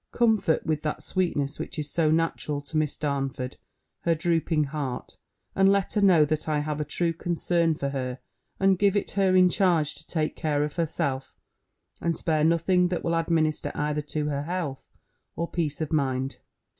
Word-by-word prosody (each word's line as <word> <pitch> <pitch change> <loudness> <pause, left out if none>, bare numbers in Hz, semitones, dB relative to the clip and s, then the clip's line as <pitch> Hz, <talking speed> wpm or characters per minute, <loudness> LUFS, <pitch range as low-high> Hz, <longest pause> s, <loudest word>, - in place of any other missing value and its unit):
Comfort, 220 -9 +2
with 155 -1 0
that 150 - -3
sweetness 150 -6 -1
which - - -6
is 150 -2 -2
so 165 -2 +2
natural 160 -2 0
to 145 +3 -10
Miss 155 -2 0
Darnford, 135 -3 -2 0.4
her 170 -1 +1
drooping 165 -1 +1
heart; 140 -3 -5 0.4
and 195 0 +4
let 200 -1 +1
her 210 - +1
know, 180 -6 +6
that 155 +1 -2
I 150 - +1
have 150 0 -2
a - - +1
true 165 +3 0
concern 170 0 0
for 140 -2 -2
her, 130 -2 -3 0.4
and 195 -1 +3
give 200 -1 +3
it - - -2
her 190 -2 +2
in 185 0 +7
charge 170 -5 +2
to - - -12
take 155 -2 -1
care 150 -2 0
of 150 +2 -4
herself, 140 -5 -2 0.6
and 170 -1 0
spare 155 -2 0
nothing 170 +3 +3
that 175 -1 -3
will 170 - 0
administer 165 -2 +1
either 150 0 -1
to 150 0 -2
her 140 -1 -1
health 170 -6 -4 0.5
or 170 - -2
peace 160 -4 -2
of 155 +1 -2
mind. 135 -2 0
155 Hz, 180 wpm, -26 LUFS, 150-175 Hz, 0.6 s, in